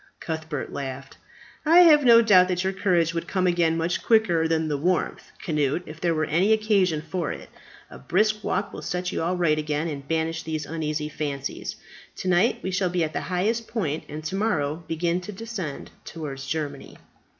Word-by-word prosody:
Cuthbert 160 -3 -5
laughed. 135 -1 -6 0.5
"I 330 +3 +7
have 305 -4 +7
no 235 -2 +7
doubt 185 -5 +6
that 180 0 -1
your 190 +1 0
courage 175 -4 +1
would 170 0 -3
come 185 -2 0
again 170 -2 +2
much 165 +2 -1
quicker 180 -8 +3
than 160 -1 0
the 150 - -1
warmth, 175 +5 -1 0.2
Cnut, 150 +1 0
if 155 +1 -11
there 170 -2 +1
were 155 0 +1
any 180 +8 +3
occasion 200 -8 +2
for 165 0 -3
it. - - -8 0.4
A 65 - -10
brisk 210 - +1
walk 195 +2 -1
will - - -7
set 180 0 -3
you - - -2
all 175 +3 0
right 155 -3 +2
again, 150 +1 -1
and 140 -3 -6
banish 160 0 -1
these 155 -2 -4
uneasy 155 -1 -3
fancies. 140 -2 -4 0.4
To - - -5
night 185 +6 +3
we 190 - -2
shall 185 0 +1
be 175 -1 0
at 155 0 -3
the - - -2
highest 215 +6 -1
point, 165 -10 -2
and 155 +1 -6
to 155 +5 -3
morrow 165 -7 -1
begin 170 +2 -1
to 180 - -7
descend 195 -8 -6
towards 140 -4 -7
Germany." 150 -1 -4
170 Hz, 195 wpm, -25 LUFS, 155-190 Hz, 0.5 s, I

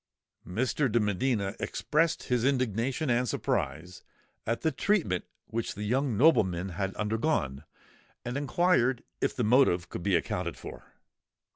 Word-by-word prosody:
Mr. 130 +6 0
de 120 - +3
Medina 105 -1 0
expressed 155 +2 0
his 125 -3 0
indignation 130 +2 0
and 120 0 +1
surprise 80 +5 -2 0.5
at 115 +1 -1
the 160 - +1
treatment 155 - 0 0.2
which 115 0 -3
the 105 - -5
young 125 +1 0
nobleman 95 - +3
had 95 +2 -3
undergone, 105 - -1 0.6
and 120 +1 -3
inquired 140 -3 +2 0.2
if - - 0
the 125 - 0
motive 105 -7 +3
could - - -6
be 95 +1 +2
accounted 85 - -2
for. - - -11
115 Hz, 135 wpm, -29 LUFS, 95-135 Hz, 0.6 s, de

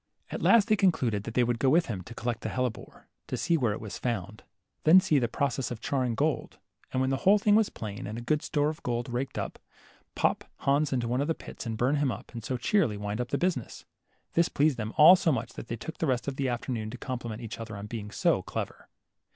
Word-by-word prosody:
At - - -4
last 230 -3 +5
they 215 - +4
concluded 125 - +1
they 120 +2 +1
would 120 -1 0
go 135 - +3
with 165 +5 +4
him 100 -6 -4
to 115 - -10
collect 120 0 -3
the - - -3
hellebore, 125 -3 -4 0.2
to - - -3
see 170 - +1
where 125 -8 +1
it - - -5
was 110 -2 -7
found, 110 -3 -3 0.4
then 165 +4 +8
see 155 -5 +2
the 120 - +1
process 130 +1 -1
of 120 - -5
charring 125 -2 -1
gold, 145 0 -1 0.3
and, 130 - 0
when 130 0 +1
the 135 - +1
whole 195 +8 +5
thing 205 0 +3
was 215 0 +4
plain, 100 -3 -6
and 110 +2 -5
a - - -5
good 150 +4 +1
store 145 0 +1
of 155 - -6
gold 120 -1 -2
raked 130 +3 -3
out, - - -4 0.6
pop - - +1 0.2
Hans 140 +1 +2
into 125 -3 0
one 125 +3 0
of 145 - -1
the 165 - 0
pits - - -9
and 110 -1 -3
burn 130 +6 +2
him 140 -3 +1
up, - - -8
and 115 -2 -6
so 130 - -2
cheerily 120 - +1
wind 105 +3 -3
up 120 - -3
the - - 0
business. 175 -10 -2 0.5
This 170 0 +3
pleased 145 -2 +2
them 110 -1 -3
all 160 +5 +10
so 170 -3 +2
much 120 -2 -2
that - - -8
they 115 - -3
took 160 +9 -8
the 165 - 0
rest 125 -1 0
of 140 - -2
the 135 -1 -1
afternoon 120 -2 -3
to - - -7
compliment 120 -3 -5
each 115 -1 -6
other 115 -2 -6
upon 100 +1 -6
being 105 -1 -6
so - - +2
clever. - - -6
125 Hz, 250 wpm, -28 LUFS, 115-150 Hz, 0.6 s, all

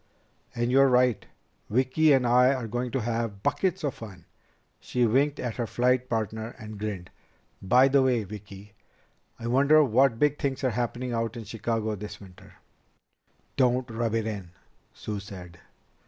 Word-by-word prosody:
"And 120 +1 0
you're 135 +1 +6
right. 125 -3 +2 0.4
Vicki 130 +7 +3
and 135 -3 +4
I 125 +3 +4
are 125 -3 -4
going 120 +3 -3
to 130 +2 -2
have 115 -3 -3
buckets 190 -1 0
of 145 -4 -1
fun." 95 -7 -11 0.5
She 125 -1 0
winked 140 +6 +1
at 120 -3 -4
her 120 -2 -2
flight 125 +2 +1
partner 110 0 -3
and 110 -1 -9
grinned. 100 -4 -5 0.5
"By 125 +8 +5
the 140 0 +4
way, 125 -4 +2
Vicki, 100 0 -11 0.6
I 115 - -9
wonder 140 +6 +5
what 130 -1 +3
big 150 +3 +1
things 135 -2 -2
are 130 - +2
happening 120 +2 -3
out 115 0 -2
in 115 - -6
Chicago 110 0 -2
this 105 +1 -8
winter." 95 -3 -15 1.0
"Don't 125 -1 +1
rub 115 0 -1
it 110 -1 0
in," 100 -5 -5 0.4
Sue 105 -1 -6
said. 90 -4 -11
120 Hz, 160 wpm, -27 LUFS, 110-130 Hz, 1.0 s, you're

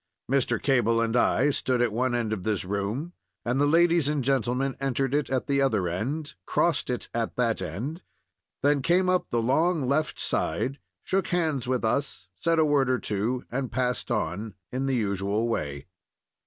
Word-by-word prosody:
Mr. 125 -3 +1
Cable 120 -4 +2
and 115 0 0
I 135 +3 +3
stood 130 -2 0
at 120 -2 +2
one 125 +2 +1
end 115 -3 -1
of 105 - -3
this 105 -2 -1
room, 105 - -3 0.3
and 125 +4 +1
the 145 - +4
ladies 170 -1 +4
and 150 -3 0
gentlemen 135 +1 0
entered 135 0 -1
it 145 0 +1
at 130 -1 0
the 140 -1 +1
other 110 -9 +2
end, 135 - -3
crossed - - +1
it - - -2
at - - -2
that - - +1
end, 150 - -4 0.6
then 145 0 +3
came 185 +6 +3
up 185 - 0
the 115 -1 0
long 155 +3 +2
left 150 +3 +1
hand - - -3
side, 135 +2 -1 0.2
shook 190 -2 0
hands 155 -8 0
with 125 -2 0
us, 115 -4 -1
said 165 0 +2
a 160 - +5
word 145 -3 +2
or 130 - +3
two, 115 +4 -2
and 130 +1 -2
passed 125 +1 -1
on, 105 -1 -2 0.2
in 130 +2 -2
the 135 - +1
usual 100 0 0
way. 70 -11 -3
130 Hz, 185 wpm, -27 LUFS, 115-145 Hz, 0.6 s, a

